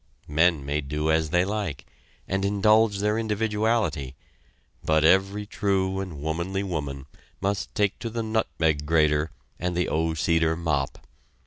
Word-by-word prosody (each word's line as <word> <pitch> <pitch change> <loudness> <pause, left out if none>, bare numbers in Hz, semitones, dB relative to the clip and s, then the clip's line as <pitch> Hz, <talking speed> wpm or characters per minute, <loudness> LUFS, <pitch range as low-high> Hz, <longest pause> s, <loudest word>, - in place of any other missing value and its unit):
Men 80 -1 +2
may 75 +2 -1
do 75 +3 -1
as 80 -1 +1
they 90 +3 +2
like, 95 -10 -3 0.4
and 95 +1 -1
indulge 105 +1 +3
their 105 +2 +1
individuality, 105 - 0 0.7
but 80 -1 +2
every 95 +4 +3
true 95 -2 0
and 90 -6 -6
womanly 85 +6 -2
woman 70 -7 -4 0.3
must 100 0 -2
take 105 -1 +1
to 115 - -4
the 115 0 -3
nutmeg 80 -9 0
grater 75 -1 +3 0.3
and 90 0 -2
the 90 - +1
O 80 +1 0
Cedar 80 0 +2
Mop. 75 -5 -2
90 Hz, 140 wpm, -25 LUFS, 80-100 Hz, 0.7 s, indulge